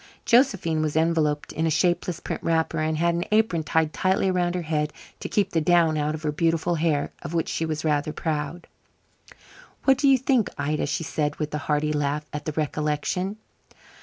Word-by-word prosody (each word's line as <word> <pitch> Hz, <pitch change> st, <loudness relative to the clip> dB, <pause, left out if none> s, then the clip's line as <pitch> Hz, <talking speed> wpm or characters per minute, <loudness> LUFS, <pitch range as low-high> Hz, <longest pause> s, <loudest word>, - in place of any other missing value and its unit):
Josephine 200 Hz, -, +3 dB
was 155 Hz, -1 st, -1 dB
enveloped 160 Hz, -2 st, +1 dB
in 160 Hz, +1 st, 0 dB
a -, -, +2 dB
shapeless 175 Hz, +1 st, +1 dB
print -, -, -5 dB
wrapper, 165 Hz, 0 st, 0 dB
and 155 Hz, 0 st, 0 dB
had 170 Hz, +1 st, +2 dB
an 170 Hz, +1 st, -1 dB
apron 215 Hz, -6 st, +2 dB
tied 155 Hz, 0 st, 0 dB
tightly 190 Hz, 0 st, +1 dB
around 180 Hz, -1 st, 0 dB
her 180 Hz, -, -2 dB
head 150 Hz, -1 st, -1 dB, 0.3 s
to -, -, -5 dB
keep 205 Hz, -, +1 dB
the 165 Hz, -, +1 dB
down 165 Hz, -1 st, +3 dB
out 150 Hz, 0 st, 0 dB
of 155 Hz, -, -9 dB
her 150 Hz, -, 0 dB
beautiful 165 Hz, +2 st, +1 dB
hair, 155 Hz, -3 st, 0 dB
of 170 Hz, -, -6 dB
which 165 Hz, -, 0 dB
she 160 Hz, -, -2 dB
was 155 Hz, 0 st, -3 dB
rather 150 Hz, 0 st, +1 dB
proud. 160 Hz, +2 st, -3 dB, 1.2 s
"What 270 Hz, -1 st, +4 dB
do 280 Hz, -, +3 dB
you 270 Hz, -1 st, +6 dB
think, 255 Hz, -4 st, +1 dB
Ida?" 150 Hz, +1 st, -1 dB
she 150 Hz, -, -2 dB
said, 150 Hz, 0 st, -1 dB
with 150 Hz, -1 st, -4 dB
a 150 Hz, -, -1 dB
hearty 150 Hz, +1 st, 0 dB
laugh 150 Hz, 0 st, -1 dB
at 150 Hz, 0 st, -5 dB
the 155 Hz, -, -1 dB
recollection. 155 Hz, +6 st, -1 dB
160 Hz, 195 wpm, -25 LUFS, 150-175 Hz, 1.2 s, you